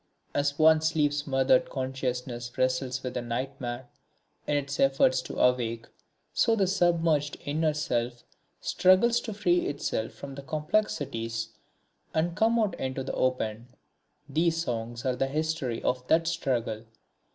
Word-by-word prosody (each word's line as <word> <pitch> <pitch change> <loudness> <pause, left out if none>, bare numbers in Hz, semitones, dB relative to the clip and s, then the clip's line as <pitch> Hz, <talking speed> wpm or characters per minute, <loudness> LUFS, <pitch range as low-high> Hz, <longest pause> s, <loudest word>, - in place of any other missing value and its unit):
As 145 0 0
one's 160 0 +5
sleep 150 -2 +2
smothered 135 -3 +2
consciousness 125 -2 -4
wrestles 130 0 0
with 125 -1 -4
a 125 - -1
nightmare 120 +1 -4 0.6
in 145 - +2
its 140 0 -3
efforts 135 -1 +4
to - - -8
awake, 115 -2 +1 0.5
so 225 - +3
the 200 -3 +2
submerged 170 -5 +2
inner 155 +1 +1
self 120 -6 -2 0.4
struggles 190 +6 +4
to 225 - -6
free 180 -4 +1
itself 140 -5 -2
from 140 - -9
its 140 - -7
complexities 140 - -1 0.7
and 165 +2 +1
come 225 +3 +3
out 215 -5 +1
into 130 0 -2
the 130 - -4
open. 120 -3 -1 0.6
These 165 +3 +1
Songs 120 -1 -4
are 130 -1 +1
the 135 +2 0
history 155 -4 -2
of 125 0 -1
that 165 +1 +3
struggle. 120 -9 -1
135 Hz, 140 wpm, -28 LUFS, 125-160 Hz, 0.7 s, one's